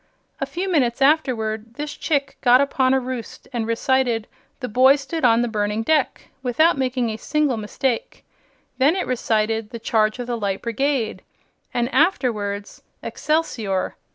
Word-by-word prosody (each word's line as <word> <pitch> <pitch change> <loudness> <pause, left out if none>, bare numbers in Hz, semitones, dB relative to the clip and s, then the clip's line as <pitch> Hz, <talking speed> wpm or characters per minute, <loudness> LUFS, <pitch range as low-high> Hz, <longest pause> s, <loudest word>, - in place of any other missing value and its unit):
A - - -2
few 365 +3 -3
minutes 265 -10 +1
afterward 235 -6 +1
this 295 +1 -5
chick 285 -3 -1
got 250 0 +6
upon 265 -2 +2
a - - +3
roost 250 -3 -7
and 230 -2 -2
recited 235 -1 +1 0.3
'The 255 - -4
Boy 260 +5 +5
Stood 305 +3 -5
on 235 -1 +5
the - - 0
Burning 210 0 -1
Deck' 300 +2 0
without 270 +7 +3
making 255 -3 -1
a 215 - -5
single 295 +1 0
mistake. 230 +3 -3 0.5
Then 285 +6 +4
it 375 - -1
recited 225 -3 0
'The 235 - -6
Charge 220 -1 +1
of 245 - -4
the 240 -1 -2
Light 195 -2 -2
Brigade' 245 0 -1 0.5
and 240 0 0
afterwards 225 - 0 0.2
'Excelsior.' 230 -12 -1
245 Hz, 155 wpm, -22 LUFS, 225-275 Hz, 0.5 s, got